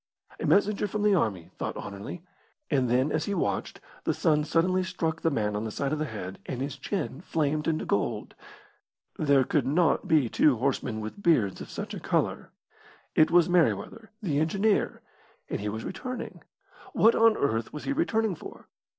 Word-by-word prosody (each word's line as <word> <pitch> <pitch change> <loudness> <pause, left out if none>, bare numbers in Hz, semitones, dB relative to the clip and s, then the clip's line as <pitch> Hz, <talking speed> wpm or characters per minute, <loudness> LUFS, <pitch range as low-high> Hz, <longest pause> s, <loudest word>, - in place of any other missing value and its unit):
A - - -2
messenger 205 +1 +3
from 210 +1 -2
the 210 -1 +4
army, 100 - 0
thought - - -3
Anerley; 100 - -7 0.5
and 130 -4 +2
then, 130 +5 +2
as 155 - 0
he 200 - -1
watched, - - -2 0.2
the - - 0
sun 150 -4 +2
suddenly 180 +4 +2
struck 165 -3 -2
the 165 - +2
man 105 -7 -1
on 105 - -2
the 110 - -3
side 140 +6 -2
of 155 - -1
the 155 - 0
head, 100 -7 -6
and 125 - -4
his 135 +1 -3
chin 150 0 -4
flamed 155 -3 -1
into 160 -1 0
gold. - - -1 0.9
There 140 -3 +4
could 135 -1 0
not 160 +2 +2
be 150 -6 +4
two 130 +3 +3
horsemen 125 -3 -1
with 110 - -7
beards 120 - +2
of - - -8
such - - -6
a - - -5
colour. - - -1 0.6
It 155 - +5
was 175 -1 +5
Merryweather, 175 - +1
the 150 -7 +1
engineer, 195 +7 +1 0.5
and - - -1
he 105 - -2
was 110 +2 -5
returning. 255 +7 -6 0.5
What 230 - +5
on 225 -1 +5
earth 115 -4 0
was 150 - -7
he - - -1
returning 225 - +1
for? - - -11
155 Hz, 185 wpm, -28 LUFS, 125-185 Hz, 0.9 s, It